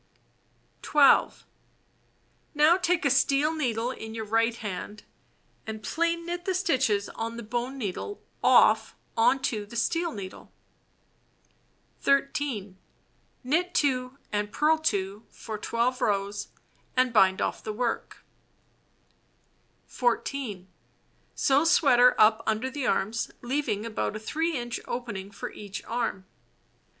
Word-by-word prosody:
12. 290 -2 +4 1.1
Now 305 +3 +6
take 360 -3 0
a 280 - +4
steel 280 +3 +3
needle 245 -6 -1
in 220 -3 -8
your 220 -1 -4
right 225 +2 +1
hand, 210 -1 -6 0.6
and 220 0 -6
plain 335 +5 -1
knit 350 +1 -4
the 375 - 0
stitches 260 - +1
on 230 +1 -5
the 235 - -6
bone 240 +4 -3
needle 250 - -4 0.2
off - - +5 0.2
on 230 +4 +4
to 220 -6 -1
the 205 +3 -12
steel 335 +8 0
needle. 195 -7 -9 1.5
13. 275 -8 0 0.6
Knit 340 +8 0
2 255 -2 0
and 205 0 -1
purl 310 +1 +2
2 205 -8 -2
for 215 -2 -7
12 235 +4 -1
rows 200 0 -1 0.5
and 255 -1 +3
bind 190 -3 +5
off - - -2
the 215 - -3
work. 235 +2 -3 1.6
14. 240 -5 -2 0.7
Sew 275 +2 +3
sweater 250 -7 +5
up 220 +1 +5
under 220 +4 0
the 275 -2 -3
arms, 220 +4 0
leaving 245 -5 -2
about 215 -1 -2
a - - -4
3 320 +8 -1
inch 240 0 -4
opening 205 -6 -5
for 200 - -7
each 205 0 -8
arm. 230 -5 -2
240 Hz, 120 wpm, -27 LUFS, 215-285 Hz, 1.6 s, Now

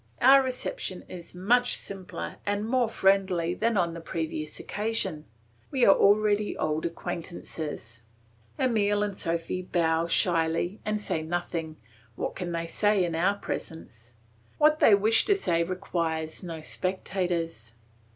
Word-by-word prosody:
Our 270 +2 +7
reception 250 -7 -3
is 175 -1 -10
much 245 +7 +3
simpler 195 -2 -7
and 205 +1 -1
more 245 -1 +2
friendly 190 -5 +2
than 225 +3 0
on 170 -2 +1
the 170 - -7
previous 160 -2 -4
occasion; 205 -7 -2 0.4
we 260 -3 +2
are 195 - +8
already 210 +1 +3
old 155 +1 -1
acquaintances. 160 -8 -6 0.6
Emile 205 -5 +2
and 205 -2 -3
Sophy 170 +1 -1
bow 165 -2 +1
shyly 170 +2 +1
and 210 0 -1
say 185 -6 -2
nothing; 165 -1 -3 0.4
what - - -3
can 175 -2 -4
they 170 0 -2
say 205 +3 +2
in 170 - -3
our 185 +5 +2
presence? 120 - -7 0.4
What 305 +1 +4
they 210 - +7
wish 215 +3 +5
to 405 - +4
say 170 - +1
requires 165 -3 -2
no 165 -4 -6
spectators. 170 - -2
180 Hz, 135 wpm, -27 LUFS, 165-205 Hz, 0.6 s, are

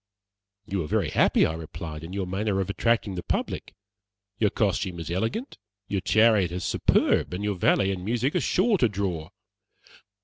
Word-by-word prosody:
"You 95 -2 -2
are - - -6
very - - 0
happy," - - +4
I 80 - -1
replied, 80 -1 -7
"in 80 - -8
your 95 0 -2
manner 95 +2 -1
of 95 +1 -1
attracting 115 -1 +1
the 90 - -4
public. - - -3 0.6
Your 105 - +3
costume 95 -4 -1
is 85 0 -5
elegant, 110 - -2 0.3
your 100 -1 -1
chariot 110 -4 +4
is 90 +1 -4
superb, - - +2
and 100 - -4
your 105 0 0
valet 95 +2 +2
and 90 -2 -4
music 120 +7 0
are 180 - +2
sure 200 +1 +2
to 120 - +4
draw." 95 -6 -3
95 Hz, 175 wpm, -26 LUFS, 90-110 Hz, 0.6 s, happy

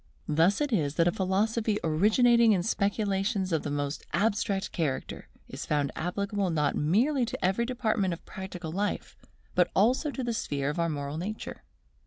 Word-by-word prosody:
Thus 165 - +3
it 290 -4 0
is 150 -7 +1
that 170 0 +3
a - - +4
philosophy 210 +4 0
originating 220 +8 +4
in 180 -3 +1
speculations 200 -2 0
of 160 - +2
the - - -4
most 145 +1 -3
abstract 200 -2 0
character, 150 -6 -3 0.2
is - - -7
found 145 -2 +1
applicable 200 +3 -1
not 150 -3 +1
merely 240 - +2
to 255 -2 -2
every 195 +6 +1
department 220 -6 0
of 170 - -6
practical 185 -4 -7
life, 200 +4 -2 0.4
but 180 -1 +3
also 250 +9 +3
to 275 -2 -4
the 240 -1 -1
sphere 145 -10 -1
of 165 - -5
our 170 0 +1
moral 145 0 -4
nature. 210 +5 -5
195 Hz, 170 wpm, -28 LUFS, 160-220 Hz, 0.4 s, a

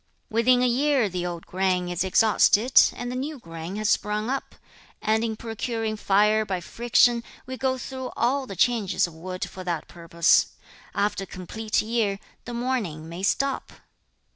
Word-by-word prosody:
3. 225 - +1
'Within 250 +1 +4
a - - +4
year 265 -1 +2
the 180 -1 -3
old 170 -1 -6
grain 185 -1 0
is 175 0 -1
exhausted, 215 +4 +5
and 245 0 -5
the - - -4
new 285 +4 -4
grain 165 -3 -8
has 215 0 -1
sprung 210 +3 0
up, 275 - -4 0.4
and, 220 +1 +1
in 225 -1 -1
procuring 225 0 -3
fire 210 +1 +3
by 195 -4 -3
friction, 235 +4 +2 0.2
we 260 - -5
go 260 +1 0
through 260 0 -6
all 260 +3 +1
the 195 - -7
changes 225 0 +2
of 170 - -9
wood 185 +3 -5
for 185 - -9
that 170 -3 -3
purpose. 170 0 +2 0.4
After 200 -1 0
a - - -27
complete 215 +5 -2
year, 215 -3 0 0.3
the 245 - -6
mourning 230 -11 -2
may 170 +2 -7
stop.' 275 +7 0
215 Hz, 170 wpm, -25 LUFS, 185-245 Hz, 0.4 s, exhausted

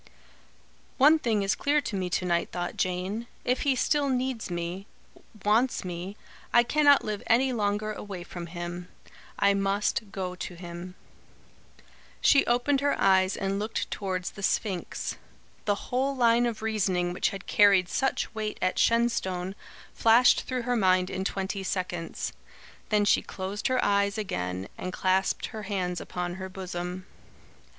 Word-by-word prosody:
"One 300 +4 +6
thing 220 -7 +1
is 195 - +2
clear 290 +1 +2
to 225 - -4
me 185 -2 -2
to 180 - -1
night," 170 -1 +1
thought 175 -1 -3
Jane. 185 +6 -2 0.2
"If 250 +1 +1
he 275 -2 +2
still 285 +2 +1
needs 255 -4 -1
me 175 +3 -4 0.6
wants 225 +2 +2
me 180 +3 -5 0.3
I 240 - +6
cannot 285 +2 +4
live 210 -2 -3
any 255 +3 +3
longer 210 -1 0
away 200 -4 -7
from 175 -1 -7
him. 175 +1 -6 0.5
I 200 - +4
must 200 +1 0
go 185 -2 -3
to 180 0 -7
him." 175 +1 -8 1.2
She 275 - +5
opened 250 +4 +2
her 285 0 +1
eyes 190 0 +4
and 195 0 -1
looked 215 +2 -3
towards 185 -2 -3
the 200 - -10
Sphinx. 195 -2 -1 0.5
The 205 - +2 0.2
whole 265 +2 +1
line 240 -1 +4
of 220 -2 -4
reasoning 190 -5 0
which - - +1
had 195 -2 -8
carried 200 -3 +5
such 265 +2 -1
weight 215 -1 -3
at 185 - 0
Shenstone 190 -6 +1 0.4
flashed 230 +2 +5
through 255 -2 -2
her 245 0 0
mind 185 -4 +3
in 190 - -2
twenty 195 0 -2
seconds. 180 -3 -3 0.6
Then 210 -1 +3
she - - +4
closed 195 +2 -4
her 255 -1 +1
eyes 200 0 +2
again 90 - -3
and 185 - -4
clasped 190 +1 +1
her 220 - -5
hands 185 -3 -2
upon 175 0 -4
her 190 - -5
bosom. 185 -1 -5
200 Hz, 155 wpm, -28 LUFS, 180-230 Hz, 1.2 s, One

